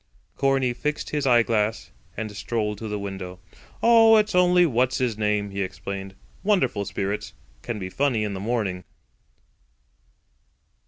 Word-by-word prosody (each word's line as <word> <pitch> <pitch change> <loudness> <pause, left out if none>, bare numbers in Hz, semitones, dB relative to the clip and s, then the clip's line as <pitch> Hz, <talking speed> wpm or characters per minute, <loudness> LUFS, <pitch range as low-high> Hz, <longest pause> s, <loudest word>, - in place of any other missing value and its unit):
Corney 135 -2 +1
fixed 150 +4 -3
his 145 -2 -1
eyeglass 115 -3 +2 0.3
and 110 -2 -5
strolled 105 -1 -2
to 110 - -5
the 105 0 -3
window. 95 -2 -6 0.5
"Oh, 225 -1 +7
it's 215 0 +1
only 180 0 +5
What's 130 -3 +1
his 125 -4 0
name," 105 -1 0
he 100 0 -3
explained. 95 +1 -5 0.3
"Wonderful 190 - +1
spirits. 100 +2 -3 0.3
Can 115 - -4
be 95 -2 -6
funny 130 -4 +1
in 105 -1 -2
the 95 - -5
morning." 100 -4 -2
110 Hz, 140 wpm, -24 LUFS, 100-135 Hz, 0.5 s, Oh